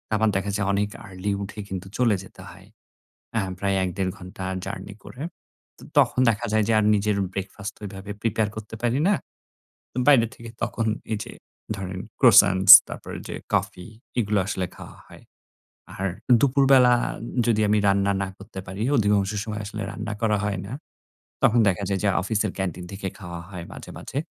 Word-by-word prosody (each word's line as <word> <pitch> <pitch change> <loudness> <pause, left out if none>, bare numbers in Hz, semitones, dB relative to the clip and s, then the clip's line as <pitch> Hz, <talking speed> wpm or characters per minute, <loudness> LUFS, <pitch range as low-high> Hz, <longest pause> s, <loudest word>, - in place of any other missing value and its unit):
আবার 110 0 +3
দেখা 100 +1 -1
যায় 100 -1 -1
অনেক 100 +1 0 0.2
আর্লি 95 +1 -4
উঠে 105 +2 -8
কিন্তু 95 -1 -6
চলে 120 -5 +3
যেতে 95 - -14
হয়। - - -16 0.7
আ - - +2 0.2
প্রায় 100 0 0
১-১.৫ 95 +1 -2
ঘণ্টা 95 0 -10 0.2
জার্নি 100 +2 -6
করে। 130 - -9 0.6
তো - - -16 0.2
তখন - - +3
দেখা 105 - -2
যায় 110 -1 +3
যে - - +3
আর 105 - +2
নিজের 105 0 +1 0.2
ব্রেকফাস্ট 100 +2 -5
ওইভাবে 100 0 -8
প্রিপেয়ার 110 -1 0
করতে 110 +1 -7
পারি 120 +2 +1
না। 205 - +4 0.9
বাইরে 135 -6 +7
থেকে 115 0 -10
তখন 115 -1 -1 0.3
এই 110 - +1
যে - - -10 0.4
ধরেন 95 -1 -5 0.2
ক্রোসান্টস 100 -6 +7 0.2
তারপর - - -9
ওইযে - - -7 0.2
কফি 90 - -1 0.3
এগুলো 105 -2 +1
আসলে 95 -3 -1
খাওয়া - - -11
হয়। - - -15 0.7
আর 95 - -3 0.3
দুপুরবেলা 135 -2 +5 0.5
যদি 110 -2 +3
আমি 105 - +4
রান্না 100 0 +3
না 95 - -3
করতে 100 -1 -9
পারি, 95 +3 -6 0.2
অধিকাংশ 105 -2 +2
সময় 110 -1 -5
আসলে 110 +1 -6
রান্না 110 0 -5
করা 105 -2 +2
হয় 100 -3 -1
না। 105 - -9 0.7
তখন 120 +2 +5
দেখা 100 +1 +1
যায় 95 -1 0
যে 105 - +3
অফিসের 105 +1 0
ক্যান্টিন 90 -2 -3
থেকে 95 0 -5
খাওয়া 85 -3 -7
হয় 90 -3 -7
মাঝে, - - -10
মাঝে। - - -7
105 Hz, 170 wpm, -24 LUFS, 95-110 Hz, 0.9 s, বাইরে